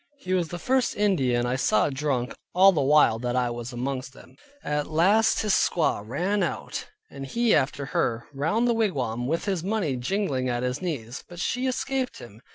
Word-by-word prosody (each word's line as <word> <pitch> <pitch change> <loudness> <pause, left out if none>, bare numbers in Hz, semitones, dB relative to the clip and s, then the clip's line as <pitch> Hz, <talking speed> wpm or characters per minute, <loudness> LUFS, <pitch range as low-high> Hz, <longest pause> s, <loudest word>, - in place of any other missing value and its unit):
He 185 -8 -4
was 180 -3 +1
the 175 - -6
first 260 +5 +1
Indian 135 -13 +1
I 125 +1 0
saw 125 0 +2
drunk 135 -3 -1 0.2
all 190 +2 +7
the 160 -6 0
while 140 -5 +4
that 120 +1 -2
I 125 -1 +1
was 120 +1 -6
amongst 130 +1 -4
them. - - -16 0.3
At 150 0 -1
last 190 +8 +3
his 210 -2 +2
squaw 165 - +2
ran 185 - -1
out, - - -3 0.2
and 135 - -8
he 230 - +1
after 140 0 +1
her, 120 -3 -1
round 165 - +1
the 240 - +3
wigwam, 130 - -1
with 165 +4 -1
his 190 -5 -1
money 190 -8 -1
jingling 130 -2 -1
at 120 0 -1
his 125 +2 -2
knees. 135 -9 -4
But 175 -1 -10
she 250 +8 -1
escaped 260 0 -2
him. 115 -1 -12
150 Hz, 190 wpm, -26 LUFS, 125-195 Hz, 0.3 s, all